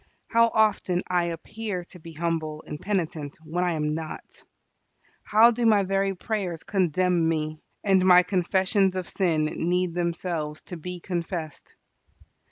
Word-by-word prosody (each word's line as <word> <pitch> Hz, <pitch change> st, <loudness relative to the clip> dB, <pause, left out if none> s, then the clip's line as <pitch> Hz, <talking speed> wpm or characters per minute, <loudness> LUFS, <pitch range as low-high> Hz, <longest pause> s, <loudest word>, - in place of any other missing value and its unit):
How 230 Hz, 0 st, +5 dB
often 210 Hz, -5 st, +1 dB
I 175 Hz, -1 st, +2 dB
appear 180 Hz, +3 st, -4 dB
to 180 Hz, -, -12 dB
be 165 Hz, 0 st, -11 dB
humble 160 Hz, -1 st, -2 dB
and 150 Hz, -, -7 dB
penitent 165 Hz, -7 st, -2 dB
when 175 Hz, +3 st, -1 dB
I 175 Hz, -1 st, +1 dB
am 150 Hz, -1 st, -1 dB
not! 160 Hz, 0 st, -7 dB, 0.8 s
How 225 Hz, +3 st, +5 dB
do 240 Hz, +1 st, -2 dB
my 215 Hz, -3 st, +5 dB
very 195 Hz, 0 st, 0 dB
prayers 185 Hz, -5 st, -3 dB
condemn 180 Hz, -2 st, +1 dB
me; 155 Hz, -1 st, -2 dB, 0.2 s
and 190 Hz, -2 st, +4 dB
my 180 Hz, -1 st, +7 dB
confessions 190 Hz, +1 st, +1 dB
of 185 Hz, -2 st, -3 dB
sin 165 Hz, -5 st, +1 dB
need 175 Hz, +3 st, 0 dB
themselves 170 Hz, -3 st, -3 dB
to 180 Hz, -, -8 dB
be 180 Hz, +2 st, -6 dB
confessed! 170 Hz, -3 st, -5 dB
180 Hz, 145 wpm, -26 LUFS, 165-195 Hz, 0.8 s, my